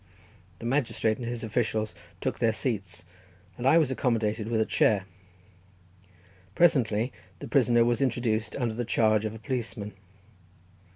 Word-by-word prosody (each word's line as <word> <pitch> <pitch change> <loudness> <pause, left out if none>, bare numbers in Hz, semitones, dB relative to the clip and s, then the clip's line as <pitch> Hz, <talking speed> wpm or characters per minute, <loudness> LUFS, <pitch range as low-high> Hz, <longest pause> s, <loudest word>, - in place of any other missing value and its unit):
The 115 - -9
magistrate 115 -4 0
and 120 - -4
his 120 -1 -4
officials 110 -1 -1 0.3
took - - -2
their 115 -2 +2
seats, 100 -7 -4 0.5
and 125 - -2
I 155 - +6
was 155 -5 +3
accommodated 115 -4 0
with 115 -1 0
a 110 - +3
chair. 100 -3 +2 1.5
Presently 125 -8 +3 0.2
the - - -8
prisoner 120 -1 +4
was 120 +1 +1
introduced 120 -4 0
under 120 -4 -1
the 120 +2 -2
charge 110 -2 +2
of 110 0 -3
a - - -7
policeman. 110 -3 -4
115 Hz, 140 wpm, -28 LUFS, 110-120 Hz, 1.5 s, I